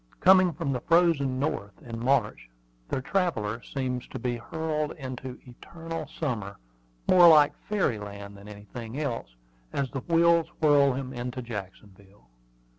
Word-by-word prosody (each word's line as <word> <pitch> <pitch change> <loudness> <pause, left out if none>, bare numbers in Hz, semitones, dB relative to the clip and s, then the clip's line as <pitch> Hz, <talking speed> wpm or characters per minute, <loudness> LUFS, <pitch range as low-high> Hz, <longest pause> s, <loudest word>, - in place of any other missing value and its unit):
Coming 185 -1 +6
from 140 - -3
the 125 - -3
frozen 165 -6 +3
North 115 -8 -3
in 115 -1 -6
March, 120 - +1 0.4
the 130 - -2
traveller 120 - -1
seems 125 -2 -4
to - - -7
be 120 0 -2
hurled 155 +4 -3
into 130 -2 -7
"eternal 165 +5 -8
summer," 120 -11 -4 0.5
more 180 -2 +8
like 150 -3 +7 0.2
fairy 180 - +1
land 100 0 -8
than 100 +1 -13
anything 110 +5 -8
else, 115 - -4 0.4
as 135 -3 -2
the 135 - -3
wheels 170 +2 +3
whirl 145 -3 +5
him 130 0 -5
into 125 +1 -5
Jacksonville. 100 - -10
130 Hz, 140 wpm, -27 LUFS, 110-155 Hz, 0.5 s, more